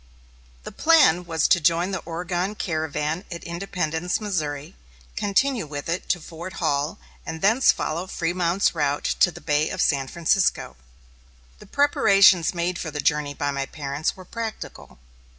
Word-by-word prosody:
The - - -8
plan 285 - +4
was 165 -2 +1
to 175 - +4
join 170 +3 +2
the 190 -3 -3
Oregon 175 +4 -2
caravan 155 -1 -2
at 170 - -6
Independence, 170 -1 -2
Missouri, 150 - -3 0.4
continue 215 - 0
with 145 -1 -6
it 170 +2 -3
to 175 - +1
Fort 170 +3 -9
Hall, 150 -4 -1 0.3
and 160 0 -6
thence 225 +6 +5
follow 170 +4 -3
Frémont's 175 +1 0
route 145 -3 -1
to - - +6
the - - -10
Bay 150 0 +1
of - - -5
San 135 -3 +1
Francisco. 170 +4 0 0.8
The - - -14
preparations 195 - +4
made 175 +1 -1
for 160 - -4
the 150 -1 -6
journey 145 0 0
by 145 +1 -1
my 140 -1 -3
parents 145 +1 -3
were 185 - -11
practical. 225 +2 -7
170 Hz, 150 wpm, -24 LUFS, 150-185 Hz, 0.8 s, to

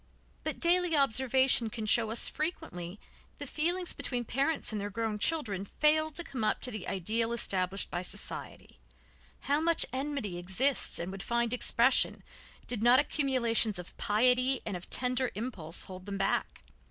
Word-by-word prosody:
But - - -3
daily 350 -1 +2
observation 260 -2 +3
can 220 0 -5
show 225 +1 +3
us 225 - +3
how - - -6
frequently 195 - -4 0.4
the - - -6
feelings 350 +3 -1
between 245 -2 -3
parents 275 +6 0
and 210 -2 -3
their 205 - -3
grown 220 0 -2
children 215 - 0
fail 310 +8 +2
to 345 - -2
come 255 -8 -5
up 215 - +1
to 250 - -1
the 215 -3 -6
ideal 225 +5 -1
established 195 -4 -2
by 175 - -2
society, 180 - -6 0.6
how 290 +2 +1
much 335 0 +2
enmity 260 -9 -3
exists 215 +10 0
and 175 +2 -4
would 195 0 -7
find 235 +1 0
expression 245 +1 +3 0.4
did 240 -4 -1
not 240 +2 +6
accumulations 250 -8 +1
of 180 -1 -7
piety 250 +4 +2
and 205 - -3
of 180 - -8
tender 250 0 +1
impulse 195 -8 -5
hold 185 0 -10
them 200 -1 -3
back. 195 - -1
235 Hz, 165 wpm, -31 LUFS, 205-275 Hz, 0.6 s, not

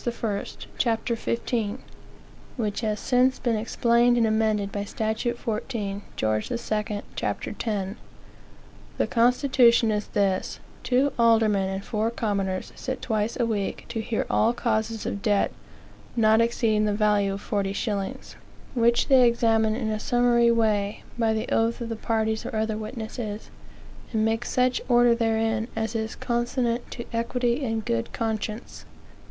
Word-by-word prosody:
I., 225 -4 -2 0.4
ch. - - +2 0.2
15, 230 -2 -1 0.8
which 215 -3 -2
has 215 -2 -1
since 255 +1 +2
been 235 -2 0
explained 235 +2 +2
and 230 - +4
amended 215 -2 +1
by 200 0 -3
statute 220 +3 -2
14 215 -3 -3
Geo. 110 0 +1
II., 210 - -3
ch. - - -2
10. 205 -3 -2 1.0
The - - +2
constitution 240 -1 +4
is 210 -1 -1
this: 195 -2 0 0.2
two 260 +2 +2
aldermen 220 -4 +4
and 195 +1 -4
four 220 0 0
commoners 200 -5 -2
sit 260 0 -4
twice 220 0 -1
a 240 - +3
week 210 -4 -2
to 230 -2 -2
hear 220 0 -2
all 225 +2 +2
causes 225 -2 -1
of 200 - -3
debt 205 -3 +2 0.6
not 220 -1 +4
exceeding 225 -2 +2
the 210 - +1
value 205 -2 +2
of 200 - -6
forty 200 -2 -1
shillings; 200 -1 -3 0.4
which 235 -1 +3
they 260 -3 +6
examine 225 -2 +2
in 225 -2 -2
a 215 - -2
summary 240 0 +3
way, 215 -3 +1
by 230 -2 +1
the 220 0 -1
oath 225 +1 +1
of 235 -1 -5
the 225 - -2
parties 220 0 -1
or - - -5
other 220 0 0
witnesses, 220 -1 -6 0.6
and 220 -1 +1
make 225 +2 0
such 250 0 +1
order 240 -1 +5
therein 225 -1 0
as 225 +1 -2
is 220 -1 -3
consonant 240 0 -1
to 235 - -7
equity 240 +3 0
and 225 -3 -2
good 115 0 -1
conscience. 220 0 -4
225 Hz, 145 wpm, -25 LUFS, 210-235 Hz, 1.0 s, they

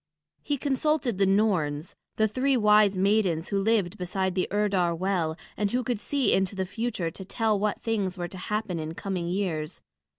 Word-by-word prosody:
He 290 0 -1
consulted 275 -5 0
the 195 - +4
Norns, 180 -7 +1 0.2
the 220 - +3
three 260 +5 +1
wise 210 -3 +5
maidens 190 -4 +2
who 200 -1 +1
lived 200 -5 +1
beside 185 +1 -1
the 185 0 0
Urdar 195 -4 +1
well, 170 -3 -1 0.2
and 205 -1 0
who 250 +4 0
could 240 -2 -1
see 275 +5 +1
into 190 +1 +1
the 190 -1 -1
future 195 -4 -3
to 190 - -9
tell 215 +1 0
what 210 0 -1
things 200 -5 -1
were 175 -1 -3
to 185 - -10
happen 210 -5 -1
in 160 +1 -5
coming 185 -3 -3
years. 175 -4 -2
195 Hz, 185 wpm, -27 LUFS, 180-220 Hz, 0.2 s, wise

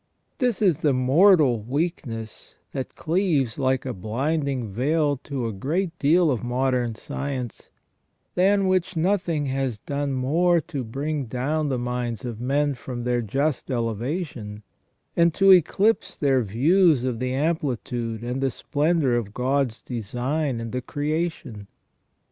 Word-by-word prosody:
This 245 -5 +1
is 180 -7 +3
the 145 -3 +2
mortal 135 - +5
weakness 120 -4 -4 0.2
that 130 -2 -5
cleaves 160 - 0
like 130 -1 +1
a 130 - -3
blinding 130 - -2
veil 145 +5 +1
to 135 -4 -3
a 115 - -2
great 165 - -2
deal 160 +2 +4
of 125 -3 -2
modern 125 -1 0
science, 130 0 -5 0.6
than 195 +2 +3
which 185 -1 0
nothing 170 -3 +1
has 135 -4 -1
done 140 +5 -3
more 165 +7 +2
to 140 -3 -5
bring 140 +5 -3
down 140 +6 -1
the 130 - 0
minds 120 -1 -3
of 115 -2 -5
men 145 +3 +1
from 120 -1 -6
their 120 0 +1
just 135 +7 -1
elevation, 115 - -3 0.5
and 170 -1 +3
to 195 -1 +6
eclipse 190 +5 +3
their 135 -3 +2
views 145 - +3
of 125 -3 -2
the 130 0 -1
amplitude 125 -6 -2
and 125 +2 -3
the 135 - +2
splendour 150 +1 +1
of 110 -4 -2
God's 130 -2 0
design 125 +4 -2
in 115 -1 -5
the 125 - -2
creation. 145 -8 -3
135 Hz, 140 wpm, -24 LUFS, 120-160 Hz, 0.6 s, to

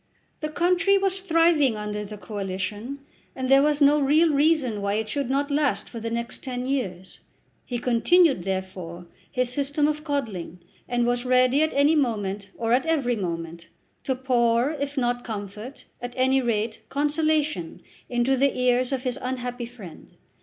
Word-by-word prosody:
The 305 - -3
country 360 +4 +3
was 385 -1 0
thriving 330 - +3
under 210 0 -4
the 210 +1 -8
Coalition, 205 +6 -5 0.3
and 260 -1 -3
there 270 0 +7
was 295 0 +2
no 290 +1 +6
real 300 +3 +4
reason 280 -7 +2
why 200 0 0
it 220 0 -1
should 275 +2 -2
not 285 +2 0
last 285 -1 +1
for 235 - -7
the 230 +1 -4
next 235 +1 -4
ten 250 -2 -4
years. 190 -10 -3 0.5
He 245 - -2
continued, 255 - +3
therefore, 185 -2 -5 0.3
his 250 -1 0
system 290 +2 +1
of 300 0 -2
coddling, 225 - -3 0.3
and 240 -1 +1
was 245 0 0
ready 255 +2 +3
at 315 - +2
any 285 +3 +4
moment, 205 -7 -1
or 230 0 0
at 260 +5 +2
every 275 -7 +1
moment, 170 -3 -5 0.4
to 265 - 0
pour, 245 0 +2
if 285 -1 -4
not 245 -1 0
comfort, 215 +3 -7 0.2
at 245 0 -6
any 260 +1 +3
rate 225 -2 -1
consolation 295 - 0 0.3
into 245 +2 +2
the 275 +1 +1
ears 250 0 +2
of 260 -2 -2
his 250 -3 -2
unhappy 245 -1 -4
friend. 210 -9 -13
250 Hz, 165 wpm, -25 LUFS, 220-285 Hz, 0.5 s, there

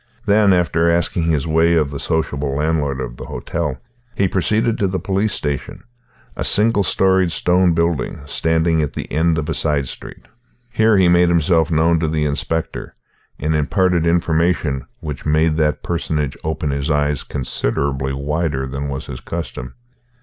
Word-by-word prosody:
Then, 100 -1 +4
after 85 -2 +2
asking 85 0 +1
his 75 -4 +1
way 80 +1 +3
of 75 -4 +1
the 70 - -5
sociable 75 -4 -1
landlord 75 -2 0
of - - -5
the - - -8
hotel, 75 -5 -3 0.4
he 100 - +2
proceeded 110 +5 0
to 100 - +2
the 95 0 -2
police 100 +4 -1
station, 70 -2 -4 0.5
a - - -3
single 105 0 +3
storied 95 -1 +2
stone 90 0 +2
building 85 -5 -1
standing 80 0 +1
at 75 - -2
the - - -6
end 80 +1 +2
of 75 -1 -2
a 80 - -1
side 75 -4 0
street. - - -10 0.5
Here 110 -1 +3
he 95 -2 +5
made 85 0 +4
himself 85 -1 +2
known 80 +1 +3
to 80 - 0
the 75 -1 0
inspector, 80 +2 -3 0.4
and 75 +3 -1
imparted 85 +2 +1
information 85 -4 +1
which 75 -4 -6
made 80 +1 +2
that 75 -2 0
personage 75 -5 -2
open 80 -1 -2
his 70 +2 -2
eyes 75 -1 +1
considerably 65 +1 -2
wider 70 0 -2
than 70 +2 -4
was 70 -1 -5
his 60 - -7
custom. 70 -6 -6
80 Hz, 165 wpm, -19 LUFS, 75-85 Hz, 0.5 s, he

